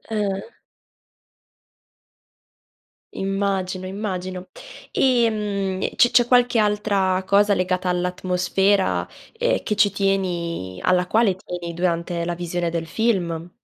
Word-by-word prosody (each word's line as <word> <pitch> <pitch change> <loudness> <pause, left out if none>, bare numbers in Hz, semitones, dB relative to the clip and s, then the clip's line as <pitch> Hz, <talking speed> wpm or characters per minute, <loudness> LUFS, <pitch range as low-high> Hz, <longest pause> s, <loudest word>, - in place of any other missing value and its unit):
Ah-ah. 200 -2 -3 2.6
Immagino, 195 -1 -2
immagino. 185 -2 -5 0.4
Ehm 210 -6 +1
e - - -2
c 245 - +4
c'è 240 -1 +4
qualche 245 -1 +4
altra 205 -3 +1
cosa 200 +1 +4
legata 185 0 -1
all'atmosfera 180 - +1 0.3
ehm, - - 0
che 210 - -1
ci 205 -1 +4
tieni 175 - -2
alla 180 -1 +2
quale 215 -1 +3
tieni, 175 -2 -6
durante 170 0 -1
la 175 0 -2
visione 175 0 -2
del 165 -1 -3
film? 175 -4 -1
185 Hz, 105 wpm, -22 LUFS, 175-205 Hz, 2.6 s, c